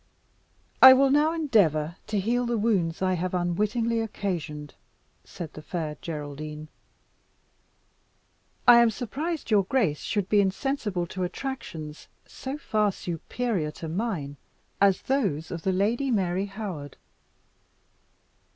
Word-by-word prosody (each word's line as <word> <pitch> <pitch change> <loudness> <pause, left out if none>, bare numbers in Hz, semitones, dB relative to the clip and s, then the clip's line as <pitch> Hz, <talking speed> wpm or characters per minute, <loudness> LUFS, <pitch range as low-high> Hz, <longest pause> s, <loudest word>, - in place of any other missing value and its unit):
"I 260 0 +12
will 270 +1 +4
now 300 +3 +4
endeavour 185 - +2
to 210 -1 0
heal 240 +5 0
the 235 -1 0
wounds 190 -6 0
I 185 0 +2
have 185 +1 -2
unwittingly 210 +7 0
occasioned," 165 -9 -4 0.5
said 160 - -8
the 155 - -9
Fair 155 -1 -4
Geraldine. 150 0 -6 2.0
"I 240 -1 +10
am 235 -1 +5
surprised 275 - -4
your 210 -2 +6
grace 190 - +1
should 205 -4 -2
be 205 0 +4
insensible 200 -2 -1
to 185 +2 -6
attractions 180 - -5 0.2
so 270 +2 -6
far 215 -7 +1
superior 180 +1 -3
to 165 - -7
mine 165 -6 -3 0.4
as 195 -2 +4
those 200 - -1
of 170 - -4
the 190 - 0
Lady 225 +9 +1
Mary 190 -3 0
Howard." 190 -9 -7
195 Hz, 125 wpm, -26 LUFS, 165-235 Hz, 2.0 s, I